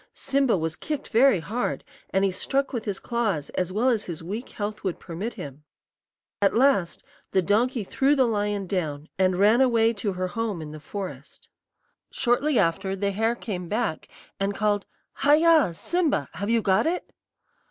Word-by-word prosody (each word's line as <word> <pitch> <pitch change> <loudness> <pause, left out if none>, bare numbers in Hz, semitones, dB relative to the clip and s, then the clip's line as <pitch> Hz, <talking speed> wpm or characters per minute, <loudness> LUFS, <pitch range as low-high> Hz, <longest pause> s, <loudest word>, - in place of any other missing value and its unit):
Simba 275 -6 +2
was 160 -1 -2
kicked 300 -2 -5
very 235 -3 +5
hard, 220 +10 -2 0.3
and 195 +1 +2
he 195 - +1
struck 270 +9 -1
with 230 -3 -3
his 200 -3 -2
claws 215 -12 -2
as 180 0 -2
well 220 +6 +1
as 230 -5 +2
his 165 -2 -6
weak 210 +9 -5
health 210 0 -5
would 185 -3 -2
permit 190 +7 -5
him. 145 - -8 0.8
At 200 - +3
last 235 -9 +2 0.3
the 190 - +3
donkey 225 +5 +1
threw 275 +8 +2
the 265 -2 +4
lion 205 -3 -1
down, 155 -5 -3
and 185 -1 +3
ran 215 +6 +5
away 230 -3 +4
to 205 -2 -2
her 185 0 -2
home 220 -1 -2
in 155 -1 -7
the 155 - -8
forest. 195 +4 -8 0.6
"Shortly 260 +3 +1
after, 190 +2 +1
the 200 +1 -1
hare 225 +4 0
came 185 -7 -5
back, 215 -6 -2 0.3
and 195 +1 -1
called, 205 -1 0 0.3
'Haya! 300 - +4
Simba! 320 - 0
have 200 +5 -4
you 230 -1 +2
got 190 +9 +3
it?' 355 +2 -3
205 Hz, 175 wpm, -25 LUFS, 185-240 Hz, 0.8 s, very